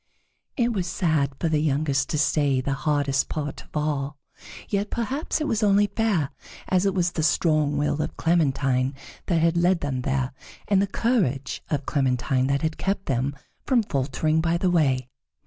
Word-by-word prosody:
It 240 -2 +2
was 185 -4 -2
sad 155 -6 0
for 170 - 0
the 155 -2 +1
youngest 140 -2 +1
to 150 - -1
say 145 -3 +2
the 135 +2 -1
hardest 140 -1 0
part 145 -2 -4
of - - -8
all, 145 -1 -2 0.5
yet 205 0 -1
perhaps 260 +8 -2
it 305 - -1
was 225 -4 0
only 205 -1 +4
fair, 205 - 0 0.4
as 185 +1 +2
it 195 - 0
was 175 -2 +1
the 160 - -2
strong 155 -2 +2
will 145 +1 0
of - - -4
Clementine 135 -5 +1 0.3
that 170 -3 +2
had 165 +1 +2
led 175 +1 +3
them 130 -3 -2
there, 130 0 -1 0.3
and 195 -2 +3
the 200 - +1
courage 185 - 0
of 145 -2 -1
Clementine 130 -1 +1
that 140 +2 0
had 160 0 -2
kept 195 0 -1
them 135 +2 -1 0.3
from 250 -4 +3
faltering 155 0 0
by 170 +1 +1
the 180 +1 +1
way. 135 -7 +2
155 Hz, 180 wpm, -25 LUFS, 140-185 Hz, 0.5 s, only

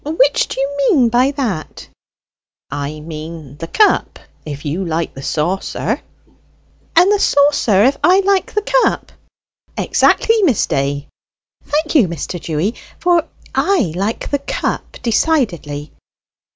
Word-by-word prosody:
"Which 290 -2 +2
do - - -6
you 280 +1 -2
mean 255 -7 +4
by 245 +3 +3
that?" 245 - -4 0.8
"I 145 +2 -4
mean 155 -2 -8
the 165 - -6
cup, 425 - +2 0.3
if 145 0 -7
you 160 +6 -2
like 165 -1 -2
the 135 - -9
saucer." 170 +7 -2 0.9
"And 355 +4 +6
the 415 - +3
saucer, 285 - +3
if 270 +3 +3
I 370 +2 +5
like 390 -1 +1
the 420 - +1
cup?" - - +1 0.7
"Exactly, 450 -1 +3
Miss 285 - +3
Day." 140 +1 -2 0.6
"Thank 310 +2 -1
you, 265 - +5
Mr. 170 +1 -5
Dewy, 165 +8 -1 0.2
for 350 -2 +2 0.3
I 345 - +1
like 200 +5 -3
the 285 - +1
cup 280 - -4
decidedly. 205 - 0
225 Hz, 130 wpm, -17 LUFS, -, 0.9 s, And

